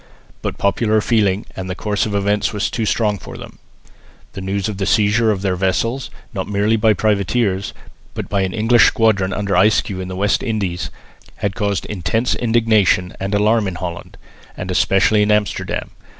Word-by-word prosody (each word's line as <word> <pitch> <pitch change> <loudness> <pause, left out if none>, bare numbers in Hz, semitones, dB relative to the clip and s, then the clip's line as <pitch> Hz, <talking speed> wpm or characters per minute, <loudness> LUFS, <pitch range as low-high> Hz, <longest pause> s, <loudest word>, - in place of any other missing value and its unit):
But - - -4
popular 110 +2 +2
feeling 105 -3 +1
and 95 -1 -5
the 90 - -3
course 105 +2 -1
of 105 - -3
events 100 +1 +1
was 105 -2 -2
too 115 -2 -2
strong 105 -3 +1
for - - -10
them. - - -11 0.7
The 95 - -6
news 95 +1 -2
of 105 -3 -4
the 95 - -2
seizure 110 +1 +3
of 100 -2 -1
their 95 -2 +1
vessels, 115 +8 -1 0.2
not 95 -3 -3
merely 105 +2 +1
by 110 0 +3
privateers, 100 -1 0 0.4
but - - -4
by 100 -1 0
an 95 -1 -1
English 115 +3 +4
squadron 105 -5 +2
under 100 -1 -2
Ayscue 95 0 +2
in 90 - -5
the 95 - -6
West 100 +3 +1
Indies, 100 -7 -2 0.5
had 100 -1 -2
caused 100 -2 -1
intense 110 +4 -1
indignation 110 -6 +2
and 95 +2 -2
alarm 105 +1 +2
in 95 - -4
Holland, 85 0 -7 0.4
and 95 0 -4
especially 100 +3 +3
in 105 - +2
Amsterdam. 105 -1 -1
105 Hz, 180 wpm, -19 LUFS, 95-110 Hz, 0.7 s, English